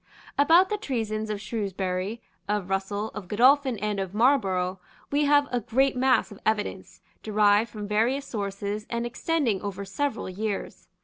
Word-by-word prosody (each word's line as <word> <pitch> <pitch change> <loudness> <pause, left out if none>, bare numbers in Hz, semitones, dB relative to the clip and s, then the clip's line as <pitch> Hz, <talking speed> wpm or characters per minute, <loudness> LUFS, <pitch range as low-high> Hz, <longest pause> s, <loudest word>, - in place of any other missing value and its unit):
About 330 +6 +5
the 420 -1 -1
treasons 220 - -2
of 210 -1 -2
Shrewsbury, 200 -1 -3 0.3
of 205 -3 -1
Russell, 200 +2 -1
of 210 -4 -8
Godolphin 255 +4 +4
and 210 0 -2
of 190 0 -4
Marlborough, 190 -7 +2 0.3
we 290 +1 +2
have 290 0 +4
a 245 - +1
great 260 +5 +1
mass 255 -2 +2
of 205 - -11
evidence, 215 -1 -2 0.2
derived 210 +1 +3
from 210 -1 -6
various 235 +7 +1
sources, 205 -1 -4
and 235 0 -2
extending 240 - 0
over 200 -1 -5
several 280 +9 -2
years. 200 +2 -4
215 Hz, 150 wpm, -26 LUFS, 200-255 Hz, 0.3 s, About